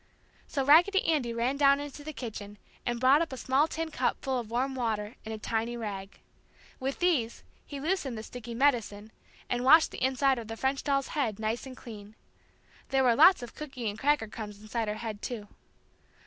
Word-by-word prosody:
So 275 -2 -1
Raggedy 350 +7 +5
Andy 290 -8 +1
ran 240 +4 -1
down 280 -1 +5
into 290 0 -7
the 310 - -5
kitchen 210 -6 -7 0.3
and 240 -1 -1
brought 265 +5 +5
up 330 - -2
a 260 - -6
small 270 +5 +2
tin 325 0 -4
cup - - 0
full 265 -2 -1
of 230 -3 -7
warm 255 +4 -1
water 220 -4 -2
and 220 - -7
a 220 - -4
tiny 225 +2 -2
rag. 200 -4 -6 0.6
With 270 +1 -2
these 310 -11 0 0.2
he 285 - -6
loosened 295 -6 -1
the 220 - -6
sticky 235 0 -8
"medicine" 230 -5 +1 0.4
and 245 0 -1
washed 315 +5 +7
the - - -5
inside 265 0 +2
of 225 - -8
the 225 0 -6
French 265 +3 -1
doll's 275 -2 0
head 240 -9 -1
nice 220 +4 -2
and 255 -1 -10
clean. 210 -2 -11 0.7
There 270 0 +2
were 245 -2 +5
lots 320 +2 +6
of 240 - -8
cooky 270 -6 -6
and 205 - -11
cracker 285 -4 +2
crumbs 210 -1 -8
inside 220 +1 -3
her 210 - -2
head, 215 -2 -6
too. 220 -4 -5
250 Hz, 200 wpm, -29 LUFS, 220-280 Hz, 0.7 s, washed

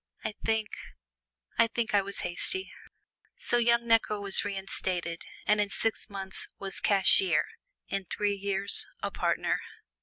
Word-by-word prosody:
I - - -2
think 220 -1 +1 0.9
I 230 - +6
think 230 -1 -2
I 205 - +5
was 200 +1 -3
hasty!" 380 - -1 0.7
So 240 - +1
young 235 0 +3
Necker 225 -2 +3
was 200 -1 +3
reinstated, 190 -4 -2 0.2
and 210 0 +3
in 205 - 0
six 225 +2 -1
months 195 -1 -6
was 195 -1 -1
cashier, 205 - +4 0.4
in 195 -1 -3
three 205 +3 0
years 200 0 0 0.2
a - - -1
partner. - - 0
205 Hz, 140 wpm, -29 LUFS, 195-225 Hz, 0.9 s, I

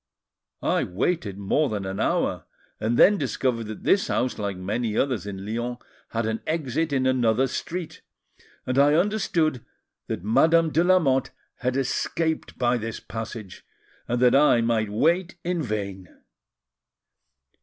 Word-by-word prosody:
I - - +2
waited 100 - -2
more 120 +10 +1
than 105 -3 -3
an 95 +1 -4
hour, - - 0 0.3
and 110 +2 0
then 205 0 +6
discovered 125 -4 -1
that 110 0 -8
this 195 - +3
house, 125 -1 -1
like 100 -2 -3
many 105 +4 -2
others 125 -8 0
in 95 -1 -6
Lyons, 120 +3 -3 0.3
had 115 0 -2
an 110 0 -2
exit 155 0 -1
in 130 -2 +1
another 125 -1 +2
street; 170 +5 -5 0.6
and 130 +1 +1
I 145 +2 +5
understood 170 - +1 0.4
that 85 - -4
Madame 160 +9 +4
de 165 - +3
Lamotte 160 -8 +3 0.3
had 125 +1 -1
escaped 160 +4 -1
by 125 -1 +2
this 115 -1 -5
passage, 110 -3 -7 0.4
and 120 +1 0
that 125 - +5
I 140 -4 +5
might 115 -2 +1
wait 170 - +1
in 175 -1 -1
vain. 100 - -4
125 Hz, 145 wpm, -25 LUFS, 110-155 Hz, 0.6 s, then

